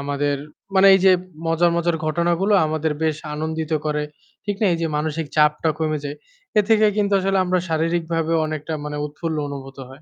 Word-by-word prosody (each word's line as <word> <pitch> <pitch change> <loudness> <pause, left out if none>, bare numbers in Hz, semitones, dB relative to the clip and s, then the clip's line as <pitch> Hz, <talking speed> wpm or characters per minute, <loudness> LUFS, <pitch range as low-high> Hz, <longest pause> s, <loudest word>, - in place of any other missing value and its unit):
আমাদের 145 0 -1 0.4
মানে 190 +1 +6
এই 190 - +3
যে 190 - +8 0.3
মজার, 165 +1 +3
মজার 170 -1 +1
ঘটনাগুলো 170 +5 +1
আমাদের 155 0 -1
বেশ 155 -2 +1 0.2
আনন্দিত 160 +1 -3
করে। 150 0 0 0.4
ঠিক 205 -1 -2
না? 215 - +3
এই - - -3
যে 165 - +1
মানসিক 155 +1 -2
চাপটা 150 +1 +3
কমে 155 -1 0
যায়। 145 +1 -5 0.4
এ - - +8
থেকে 215 -1 +5
কিন্তু 205 -1 +1
আসলে 195 +1 +1
আমরা 185 0 +1
শারীরিকভাবে 165 0 0
অনেকটা 155 0 -5
মানে 150 0 -4
উৎফুল্ল 160 +2 -4
অনুভূত 135 -1 -8
হয়। 130 - -9
160 Hz, 180 wpm, -21 LUFS, 150-175 Hz, 0.4 s, যে